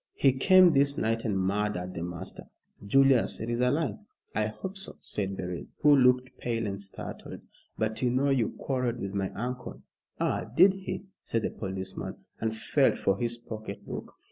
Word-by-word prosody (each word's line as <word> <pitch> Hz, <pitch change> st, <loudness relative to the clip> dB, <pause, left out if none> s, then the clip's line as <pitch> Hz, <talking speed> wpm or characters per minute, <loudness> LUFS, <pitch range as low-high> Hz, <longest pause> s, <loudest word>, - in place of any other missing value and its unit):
"He 135 Hz, -2 st, +4 dB
came 185 Hz, +5 st, +6 dB
this 140 Hz, 0 st, +3 dB
night 115 Hz, +1 st, 0 dB
and 105 Hz, -4 st, +1 dB
murdered 95 Hz, -1 st, -1 dB
the 85 Hz, -, -5 dB
master." 85 Hz, -1 st, -6 dB, 0.4 s
"Julius, 135 Hz, +3 st, +4 dB
it 110 Hz, +2 st, -3 dB
is 120 Hz, +1 st, 0 dB
a 125 Hz, -, +4 dB
lie!" 140 Hz, -5 st, 0 dB, 0.3 s
"I 105 Hz, +1 st, +1 dB
hope 190 Hz, -, -6 dB
so," 195 Hz, +1 st, -6 dB
said 100 Hz, -2 st, -3 dB
Beryl, 90 Hz, -2 st, -4 dB, 0.2 s
who 150 Hz, -1 st, +7 dB
looked 125 Hz, -1 st, +3 dB
pale 115 Hz, -2 st, -1 dB
and 100 Hz, -1 st, -3 dB
startled; 100 Hz, -1 st, -7 dB, 0.4 s
"but 110 Hz, 0 st, -1 dB
you 125 Hz, -, +3 dB
know 135 Hz, +3 st, +2 dB
you 125 Hz, -5 st, +2 dB
quarrelled 125 Hz, -3 st, -1 dB
with 95 Hz, 0 st, -4 dB
my 95 Hz, -1 st, -1 dB
uncle." 125 Hz, +3 st, -5 dB, 0.4 s
"Ah, -, -, 0 dB
did 190 Hz, +4 st, +7 dB
he?" 195 Hz, 0 st, -5 dB, 0.2 s
said 115 Hz, -1 st, -1 dB
the -, -, -1 dB
policeman, 95 Hz, -1 st, -5 dB, 0.2 s
and 110 Hz, 0 st, -1 dB
felt -, -, +2 dB
for 95 Hz, -, +2 dB
his 120 Hz, 0 st, -1 dB
pocket 110 Hz, -3 st, -8 dB
book. -, -, -7 dB
115 Hz, 180 wpm, -29 LUFS, 100-135 Hz, 0.4 s, who